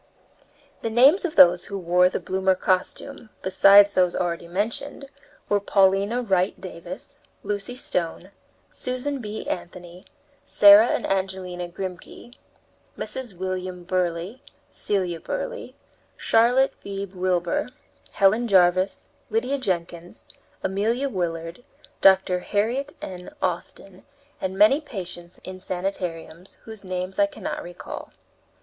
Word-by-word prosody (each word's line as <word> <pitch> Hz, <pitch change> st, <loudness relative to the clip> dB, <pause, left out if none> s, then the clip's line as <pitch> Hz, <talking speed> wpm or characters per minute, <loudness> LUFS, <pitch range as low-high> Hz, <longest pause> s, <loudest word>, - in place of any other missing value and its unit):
The 225 Hz, -, -2 dB
names 270 Hz, -, +5 dB
of 330 Hz, -, -3 dB
those 175 Hz, 0 st, +7 dB
who 200 Hz, -, -5 dB
wore 180 Hz, 0 st, +3 dB
the -, -, -3 dB
bloomer 190 Hz, 0 st, +1 dB
costume, 215 Hz, +7 st, -2 dB
besides 200 Hz, +2 st, +6 dB
those 180 Hz, -1 st, +2 dB
already 170 Hz, -1 st, -2 dB
mentioned, 230 Hz, +9 st, -4 dB, 0.4 s
were 205 Hz, -, +2 dB
Paulina 200 Hz, +4 st, +2 dB
Wright 190 Hz, -3 st, 0 dB
Davis, 185 Hz, +10 st, -9 dB, 0.2 s
Lucy 205 Hz, +4 st, -3 dB
Stone, 180 Hz, -5 st, -3 dB, 0.4 s
Susan 255 Hz, +3 st, -3 dB
B. 215 Hz, 0 st, -6 dB
Anthony, 175 Hz, +1 st, -7 dB, 0.4 s
Sarah 205 Hz, +2 st, +7 dB
and -, -, -1 dB
Angelina 185 Hz, -2 st, -3 dB
Grimke, 185 Hz, +6 st, -8 dB, 0.6 s
Mrs. 245 Hz, -8 st, -4 dB
William 185 Hz, -1 st, -4 dB
Burleigh, 180 Hz, +4 st, -2 dB, 0.3 s
Celia 185 Hz, -5 st, -1 dB
Burleigh, -, -, -5 dB, 0.4 s
Charlotte 245 Hz, +4 st, +3 dB
Beebe 195 Hz, -1 st, -6 dB
Wilbour, 180 Hz, +3 st, -1 dB, 0.4 s
Helen 215 Hz, +5 st, +3 dB
Jarvis, 185 Hz, -1 st, +3 dB, 0.2 s
Lydia 280 Hz, -, -1 dB
Jenkins, 175 Hz, -5 st, -4 dB, 0.4 s
Amelia 225 Hz, +8 st, 0 dB
Willard, 170 Hz, 0 st, -4 dB, 0.4 s
Dr. 190 Hz, -1 st, +5 dB
Harriet 225 Hz, +9 st, -1 dB
N. 180 Hz, -1 st, -7 dB
Austin, 185 Hz, +1 st, -4 dB, 0.4 s
and 190 Hz, 0 st, -3 dB
many 215 Hz, +9 st, +5 dB
patients 180 Hz, -, -7 dB
in 185 Hz, 0 st, -8 dB
sanitariums, 180 Hz, -2 st, -4 dB
whose 220 Hz, -2 st, -9 dB
names 185 Hz, +2 st, -4 dB
I 300 Hz, -, +5 dB
cannot 300 Hz, 0 st, -6 dB
recall. 175 Hz, 0 st, -9 dB
190 Hz, 115 wpm, -24 LUFS, 180-225 Hz, 0.6 s, those